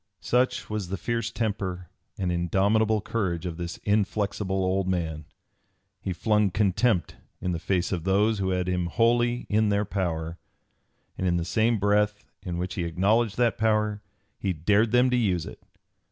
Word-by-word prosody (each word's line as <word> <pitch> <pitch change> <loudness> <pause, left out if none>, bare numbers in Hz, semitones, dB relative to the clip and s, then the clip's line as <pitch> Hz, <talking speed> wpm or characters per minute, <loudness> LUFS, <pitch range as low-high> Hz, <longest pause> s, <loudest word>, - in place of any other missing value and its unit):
Such 125 0 +1
was 105 -3 -3
the 95 +2 -3
fierce 115 +6 -2
temper 100 -6 -3 0.3
and 90 -2 -1
indomitable 100 +5 +2
courage 95 -6 -2
of 85 -2 -4
this 85 0 -5
inflexible 100 -1 0
old 95 0 0
man! 80 -4 -2 0.8
He 95 - -3
flung 105 +3 +2
contempt 100 0 +1 0.2
in 90 - -2
the 85 - -2
face 90 +1 0
of 85 -4 -2
those 100 +3 +2
who 95 -1 0
had 90 -1 0
him 90 -1 0
wholly 120 +5 +2
in 110 0 +2
their 100 +1 +1
power, 85 -4 -3 0.8
and 95 - 0
in 85 -1 +2
the 85 - -2
same 110 +5 +2
breath 105 +1 +1 0.2
in 90 -3 -4
which 90 +1 -3
he 90 - -2
acknowledged 100 +6 +1
that 120 -3 +2
power 105 -1 +1 0.4
he 95 -2 -1
dared 105 +7 +2
them 125 +1 +4
to 125 - +3
use 95 -8 +1
it. - - -10
100 Hz, 170 wpm, -26 LUFS, 90-110 Hz, 0.8 s, them